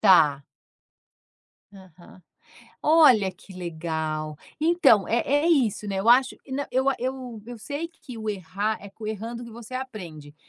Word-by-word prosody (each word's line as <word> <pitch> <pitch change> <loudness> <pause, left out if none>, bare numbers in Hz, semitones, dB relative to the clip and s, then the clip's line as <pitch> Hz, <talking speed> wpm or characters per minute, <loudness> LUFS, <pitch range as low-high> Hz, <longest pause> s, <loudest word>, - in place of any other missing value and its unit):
Tá. 150 -9 +5 1.3
Aham. 185 -2 -16 0.6
Olha 275 -11 +6
que 190 - -16
legal. 160 -3 -4 0.2
Então, 315 - +4
é 230 - +2
é 290 +3 +2
isso, 240 - +2
né, 195 - -2
eu 210 - 0
acho 255 +2 +5
e 265 - -10
nã 280 +2 -2
eu 265 +1 +2
a 275 - +3
eu 255 -3 -4
eu 240 -1 -8
sei 290 +8 -5
que 295 -7 -12
o 220 - -5
errar, 200 +2 -2
é 200 - -10
com 215 +2 -9
errando 230 +3 -5
que 235 - -10
você 235 +2 -10
aprende, 175 - -7
220 Hz, 160 wpm, -25 LUFS, 185-260 Hz, 1.3 s, Olha